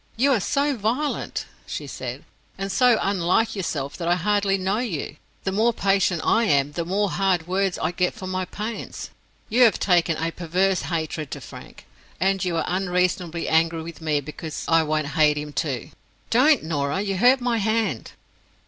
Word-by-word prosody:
"You 275 +4 +3
are 235 - +2
so 280 +7 0
violent," 245 +7 -2 0.2
she - - -5
said, - - -6 0.3
"and 195 0 -3
so 250 -1 +4
unlike 195 +4 +1
yourself, 145 -8 -3
that 170 - -4
I 175 - +4
hardly 200 +2 +1
know 190 +3 0
you. 170 - -4 0.3
The 190 - -1
more 225 +4 +2
patient 195 -5 +1
I 230 +1 +3
am, 140 -4 +2
the 170 +3 -3
more 195 +2 0
hard 185 -4 +1
words 190 0 0
I - - -1
get 180 0 0
for 185 - -8
my 185 0 -2
pains. 215 +5 -6 0.4
You 240 +4 +2
have 235 -3 +6
taken 170 -4 +2
a 165 +1 -1
perverse 180 +3 0
hatred 160 -3 -3
to - - -6
Frank; - - -12 0.3
and 195 0 +1
you 175 -2 -1
are - - 0
unreasonably 180 -2 -1
angry 165 0 +2
with 165 0 -9
me 150 -2 0
because 150 +2 -7
I 165 0 +5
won't 155 -1 -1
hate 150 -1 +3
him, 150 0 -5
too. 135 -7 -3 0.4
Don't, 265 - +5
Norah! 150 +2 -1
you 195 -2 -2
hurt 250 +6 +5
my 245 -2 0
hand." 215 - -1
185 Hz, 180 wpm, -24 LUFS, 160-210 Hz, 0.4 s, have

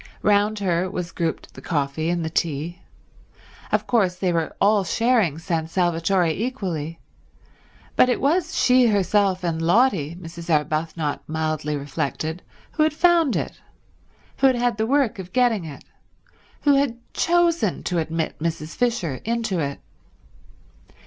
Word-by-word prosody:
Round 210 +1 +3
her 185 -2 0
was 180 -2 -4
grouped 165 -2 -3
the - - -11
coffee 155 0 -1
and 170 -1 -1
the - - -2
tea. 165 +2 -2 0.9
Of - - +1
course 195 -7 +2
they 180 -1 0
were 165 -1 -1
all 205 0 +4
sharing 220 - +2
San 165 -1 -2
Salvatore 175 +1 +1
equally, 175 - -3 1.0
but 255 - +5
it 245 - +1
was 325 +4 +1
she 250 -1 +5
herself 200 -2 +2
and 165 -2 -1
Lotty, 175 - +2
Mrs. 170 -1 -9
Arbuthnot 155 0 0
mildly 155 -1 -2
reflected, 155 +3 -3 0.3
who 310 - -2
had 310 0 +3
found 335 -4 +4
it, - - -4 0.8
who 270 - +5
had 260 - +3
had 240 -2 0
the 220 0 0
work 255 -5 +1
of 185 0 -8
getting 240 -8 +2
it, 150 -3 -9 0.8
who 285 - +4
had 275 -4 +1 0.2
chosen 335 - +1
to 175 -2 -1
admit 160 0 -3
Mrs. 160 -1 -3
Fisher 230 - -1
into 225 -5 -1
it. 140 -2 -3
180 Hz, 140 wpm, -23 LUFS, 160-235 Hz, 1.0 s, but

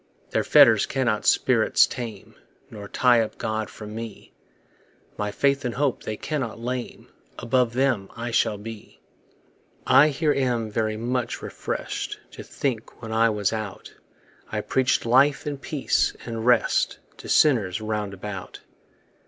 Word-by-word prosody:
Their - - +1
fetters - - +6
cannot 125 -5 0
spirits - - +4
tame, 115 -6 -7 0.4
Nor 105 -2 -8
tie 120 +2 +4
up 110 - -4
God 110 0 -3
from 105 -1 -9
me; 115 -1 -8 0.8
My 105 0 -2
faith 140 +6 +1
and 125 -2 -3
hope 140 -1 0
they 110 - -5
cannot 135 -8 -3
lame; 125 +1 -5 0.3
Above 125 -1 +1
them 125 -6 0
I 120 +1 -4
shall 105 -2 +1
be. 110 +1 -10 0.9
I 150 - +6
here 150 0 +1
am 120 -5 -1
very 110 0 -1
much 120 +1 -2
refreshed - - -4
To - - -9
think, 120 -5 -4
when 110 - -6
I 115 +1 +3
was 105 -1 0
out 110 -3 -6 0.6
I - - -1
preached 130 -1 +1
life 135 +5 +4
and 145 -2 -4
peace 150 -4 0
and 115 0 -4
rest 120 -2 +3 0.2
To - - -10
sinners 110 - +3
round 105 -2 -3
about. 95 -1 -7
115 Hz, 145 wpm, -24 LUFS, 110-130 Hz, 0.9 s, fetters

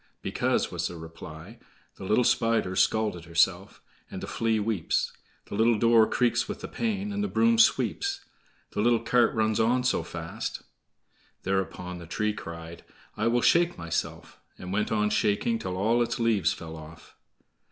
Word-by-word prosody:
"Because," - - 0
was - - -2
the 90 - -8
reply: 80 +5 -10 0.4
"The - - -8
little 105 +6 +3
Spider's 115 -6 +1
scalt 105 -2 +1
herself, 85 +3 0 0.3
And - - -6
the - - -5
Flea 115 -1 0
weeps; 105 -5 -1 0.3
The - - -10
little 110 +2 +3
door 115 0 +5
creaks 120 -1 +1
with - - -5
the - - -5
pain, 210 -3 -2
And 205 0 -1
the - - 0
broom 230 +2 +3
sweeps; 395 - +2 0.5
The 105 - -1
little 120 +1 +3
cart 125 -1 +3
runs 110 -1 +1
on 120 +3 +2
so 130 - +1
fast,"— - - -6 0.8
Thereupon 90 -1 -2
the 85 - -10
tree 105 +4 -1
cried, 85 -3 -9 0.3
"I - - 0
will 120 +1 +2
shake 170 0 +3
myself!" 85 -1 -4 0.2
and 90 +1 -7
went 105 +1 0
on 105 -1 +1
shaking 110 - +1
till 90 - -4
all 115 +5 +2
its 120 - -1
leaves 115 -4 +2
fell 80 -1 -7
off. 80 +1 -13
110 Hz, 165 wpm, -27 LUFS, 90-120 Hz, 0.8 s, door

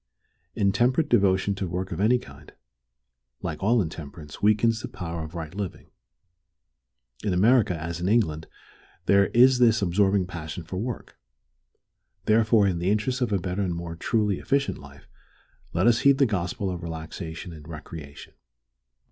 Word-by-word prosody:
Intemperate 120 +9 +2
devotion 95 0 +3
to 95 -1 -3
work 90 +3 -4
of - - -4
any 110 +5 +4
kind, - - -13 0.9
like 80 -4 -4
all 110 +2 +3
intemperance, 75 -2 -9
weakens 110 +2 +3
the - - -5
power 85 -2 -5
of 80 +2 -9
right 80 -1 -6
living. 100 -2 -6 1.3
In 100 -3 0
America, 105 -3 +3
as 85 +2 -5
in 90 - 0
England, 80 -9 +1 0.6
there 100 0 +4
is 125 +1 +5
this 120 -2 +5
absorbing 95 +1 +2
passion 85 -1 -7
for 90 +3 -6
work. 115 +4 -5 1.1
Therefore, 110 -1 +4
in 90 -3 -1
the 90 +2 0
interest 105 +5 0
of 120 - 0
a 100 - +3
better 90 +2 -3
and 90 -3 -1
more 85 0 -5
truly 105 +2 0
efficient 140 0 0
life, - - -14 0.6
let 90 +4 +1
us 120 -1 +5
heed 140 -1 +5
the 140 - +4
gospel 95 -2 -2
of 90 -1 -5
relaxation 80 +1 -7
and 75 -2 -12
recreation. 80 -3 -9
95 Hz, 155 wpm, -26 LUFS, 85-110 Hz, 1.3 s, is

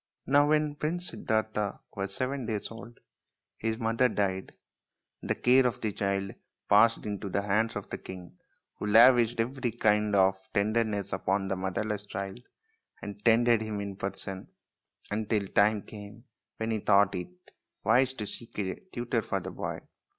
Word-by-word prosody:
Now 145 +2 +4
when 150 -1 +2
Prince 170 +4 -2
Siddartha 110 -2 -1 0.2
was 95 0 -3
seven 130 -1 -2
days 110 -2 -3
old 115 +1 -11 0.6
his 110 0 -1
mother 115 +2 +2
died, 95 -3 -1 0.7
and - - -8
the - - +2
care 125 +1 +5
of 120 - -3
the 110 -2 -2
child 100 -1 -1 0.3
passed 115 +3 +5
into 100 -1 -4
the 100 +2 -1
hands 105 +3 +1
of - - -5
the - - -4
king, 90 -1 -10 0.4
who 105 - -3
lavished 120 +1 +6
every 125 +2 -1
kind 105 -2 +2
of 95 0 +4
tenderness 105 -1 0
upon 95 +1 0
the 95 - 0
motherless 100 +3 -3
child, 95 +3 -5 0.6
and 105 0 -8
tended 115 0 +4
him 110 -2 -3
in 100 -1 -5
person 95 -1 -5 0.6
until 105 0 0
the 100 - -7
time 105 0 +3
came 105 +1 -11 0.3
when 110 0 -2
he 110 - 0
thought 100 -1 +4
it 90 -2 -4 0.6
wise 130 +1 +3
to 105 - -4
seek 115 +3 -10
a 95 -3 -1 0.2
tutor 120 -1 -1
for 100 -2 -2
the 95 +1 -7
boy. - - -5
105 Hz, 165 wpm, -29 LUFS, 100-115 Hz, 0.7 s, lavished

